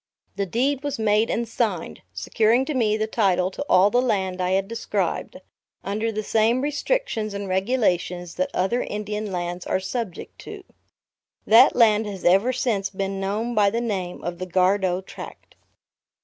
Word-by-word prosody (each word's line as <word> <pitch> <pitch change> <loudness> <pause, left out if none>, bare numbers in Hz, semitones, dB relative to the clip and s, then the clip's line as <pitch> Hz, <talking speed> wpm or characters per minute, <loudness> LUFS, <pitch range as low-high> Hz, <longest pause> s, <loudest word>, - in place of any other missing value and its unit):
The 200 0 -2
deed 260 +8 0
was 285 -1 -2
made 215 0 +2
and 235 0 -1
signed, 215 -7 -2
securing 220 - +1
to 305 - -3
me 220 -5 +1
the 215 - 0
title 190 -5 +1
to 285 - -5
all 190 +3 +5
the 245 - +3
land 190 -6 -1
I 180 +1 0
had 195 0 +1
described; 230 +1 -3 0.4
under 215 +3 -2
the 215 0 -3
same 225 +4 +2
restrictions 290 - -1
and 200 0 -4
regulations 185 -4 0
that 280 0 -1
other 215 +7 0
Indian 210 0 -4
lands 175 0 -4
are - - +1
subject 200 -1 -5
to. 415 -2 -9 0.8
That 235 +5 +7
land 220 -2 +4
has 195 -3 -7
ever 195 +8 +4
since 220 -6 -1
been 195 0 -3
known 210 +5 -2
by 210 -3 +4
the 230 - -1
name 195 -7 -3
of 175 0 -4
the 185 - -4
Gardow 185 0 +1
Tract. - - -11
210 Hz, 165 wpm, -23 LUFS, 190-235 Hz, 0.8 s, That